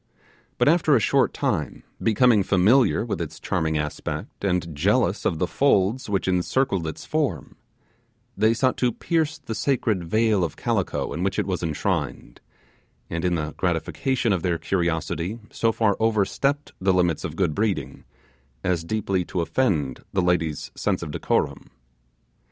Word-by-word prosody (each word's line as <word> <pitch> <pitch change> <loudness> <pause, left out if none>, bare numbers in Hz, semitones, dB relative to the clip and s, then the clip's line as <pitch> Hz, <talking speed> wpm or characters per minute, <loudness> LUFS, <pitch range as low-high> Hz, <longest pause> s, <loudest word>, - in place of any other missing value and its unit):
But - - +2
after 160 -2 +4
a - - +5
short 105 - +2
time, - - -2 0.2
becoming 115 -1 +4
familiar 100 +6 +3
with - - -3
its - - -6
charming 80 -1 -1
aspect, 75 +5 -5
and 90 -4 0
jealous 100 - +1
of 80 - +1
the 90 - +1
folds 110 +1 +1
which 100 -2 0
encircled 95 0 +1
its 80 - -6
form, 145 - -2 0.8
they 110 +3 +3
sought 130 +2 +1
to 125 -1 +2
pierce 155 0 -1
the 140 -7 -6
sacred 110 -7 0
veil 110 +2 +2
of 80 - -3
calico - - -1
in 85 - -4
which 95 +1 -1
it 105 - +1
was 90 -3 -2
enshrined, 75 -6 -3 0.7
and 85 0 -2
in 90 -1 +1
the 75 -2 -3
gratification 105 - 0
of 90 - -1
their 85 -2 0
curiosity 85 +2 -1
so 115 - +1
far 110 -3 +2
overstepped 110 +6 +1
the 95 0 +3
limits 90 -4 +1
of - - -4
good 75 - +1
breeding, 105 +2 -2 0.6
as 90 -3 0
deeply 95 -1 -1
to 90 - -2
offend 80 - 0
the 95 - +2
lady's 85 -4 0
sense - - -1
of 75 - -5
decorum. - - -1
95 Hz, 155 wpm, -24 LUFS, 85-115 Hz, 0.8 s, a